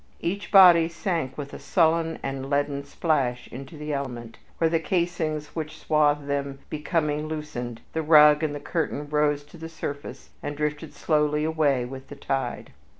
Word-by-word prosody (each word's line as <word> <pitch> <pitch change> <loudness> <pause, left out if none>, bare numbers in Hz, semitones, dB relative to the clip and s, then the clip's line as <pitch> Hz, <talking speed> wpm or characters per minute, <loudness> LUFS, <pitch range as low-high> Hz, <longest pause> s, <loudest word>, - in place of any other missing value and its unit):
Each 200 +4 -3
body 175 -4 +8
sank 165 -6 -3
with 140 -1 -6
a - - -7
sullen 165 -2 +2
and 135 0 -4
leaden 140 0 0
splash 130 -7 -1
into 135 +5 -9
the 150 0 -4
element, 120 -5 -5 0.2
where, 165 - +3
the 165 0 +1
casings 160 -3 -2
which 155 -1 -5
swathed 150 -2 +2
them 140 -1 -2
becoming 150 -1 -1
loosened, 135 -7 -5
the 160 - 0
rug 150 -1 +7
and 150 -2 -1
the - - -5
curtain 150 -1 -2
rose 150 -1 +2
to 150 +4 -15
the 165 0 -7
surface 145 -3 -7
and 145 - -5
drifted 150 +1 -3
slowly 150 -1 +1
away 150 -5 +1
with 130 +1 -9
the - - -9
tide. 135 0 -3
150 Hz, 165 wpm, -25 LUFS, 140-160 Hz, 0.2 s, body